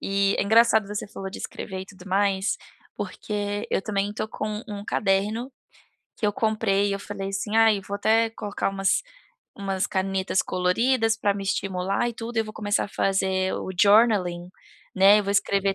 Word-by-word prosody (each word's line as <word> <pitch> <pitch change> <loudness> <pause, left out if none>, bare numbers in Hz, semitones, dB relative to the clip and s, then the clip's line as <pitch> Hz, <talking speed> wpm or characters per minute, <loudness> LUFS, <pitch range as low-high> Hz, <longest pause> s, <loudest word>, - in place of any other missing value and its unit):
e 195 0 +1
é - - +3
engraçado 220 0 +4
você 210 0 -4
falou 195 -1 -7
de 190 - -8
escrever 190 -2 -6
e - - -6
tudo 190 -1 -13
mais, 195 0 +1 0.4
porque 205 0 -4
eu - - 0
também 200 -1 -1
estou 215 - -4
com 215 0 -4
um 205 -1 -6
caderno, 210 +7 0 0.6
que 215 - -1
eu 205 - +1
comprei 215 -3 +1
e - - 0
eu 200 - -2
falei 195 -1 -5
assim: 210 +2 -2
"Ai 220 -3 +5
vou 200 +1 -7
até 225 +2 +3
colocar 210 -3 -3
umas 195 - +1 0.5
umas 195 -1 -1
canetas 190 0 0
coloridas 225 +6 +1
pra 205 -3 +1
me 200 - -5
estimular 195 +2 -1
e - - -4
tudo 230 +1 -7
e 225 - +4
vou 215 0 -9
começar 205 -2 0
a - - -8
fazer 190 -1 0
o - - -4
journaling", 200 -5 +4 0.5
né 195 +2 +7
eu 205 - -5
vou 200 - -1
escrever 200 -1 +1
200 Hz, 185 wpm, -25 LUFS, 195-215 Hz, 0.6 s, né